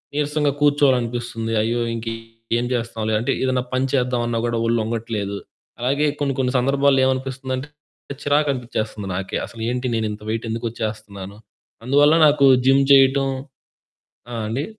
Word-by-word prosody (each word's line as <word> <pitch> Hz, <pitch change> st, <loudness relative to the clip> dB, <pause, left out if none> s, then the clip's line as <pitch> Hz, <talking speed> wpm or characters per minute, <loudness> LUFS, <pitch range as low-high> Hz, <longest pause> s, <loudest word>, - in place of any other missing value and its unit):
నీరసంగా 150 Hz, 0 st, +1 dB
కూర్చోవాలనిపిస్తుంది. 120 Hz, -5 st, +1 dB
"అయ్యో! 115 Hz, +2 st, 0 dB
ఇంకేం 115 Hz, +1 st, -4 dB
చేస్తాంలే" 115 Hz, -2 st, -2 dB
అంటే 125 Hz, +4 st, -1 dB
ఏదైనా 130 Hz, -1 st, +1 dB
పని 130 Hz, +1 st, +1 dB
చేద్దామన్నా 125 Hz, -3 st, 0 dB
గూడా 120 Hz, -1 st, -1 dB
ఒళ్ళొంగట్లేదు. 110 Hz, -3 st, -2 dB, 0.4 s
అలాగే 140 Hz, +5 st, +1 dB
కొన్ని 140 Hz, -1 st, +1 dB
కొన్ని 125 Hz, 0 st, 0 dB
సందర్భాల్లో 135 Hz, +1 st, +3 dB
ఏమనిపిస్తుందంటే 130 Hz, +1 st, -2 dB, 0.5 s
చిరాకు 145 Hz, +1 st, +2 dB
అనిపించేస్తుంది 110 Hz, -5 st, -4 dB
నాకే 95 Hz, +1 st, -3 dB
అసలు 115 Hz, -, -9 dB
ఏంటి 125 Hz, +1 st, -2 dB
నేను 110 Hz, -1 st, 0 dB
ఇంత 105 Hz, -, -8 dB
వెయిట్ 115 Hz, +1 st, -2 dB
ఎందుకు 115 Hz, +1 st, -3 dB
వచ్చేస్తున్నాను. 105 Hz, -3 st, -6 dB, 0.5 s
అందువల్ల 145 Hz, +4 st, +4 dB
నాకు 145 Hz, -1 st, +4 dB, 0.2 s
జిమ్ 135 Hz, +1 st, +5 dB
చేయటం 135 Hz, 0 st, +5 dB, 1.0 s
ఆ! -, -, -5 dB
అండి. 120 Hz, +7 st, -2 dB
120 Hz, 130 wpm, -21 LUFS, 115-135 Hz, 1.0 s, జిమ్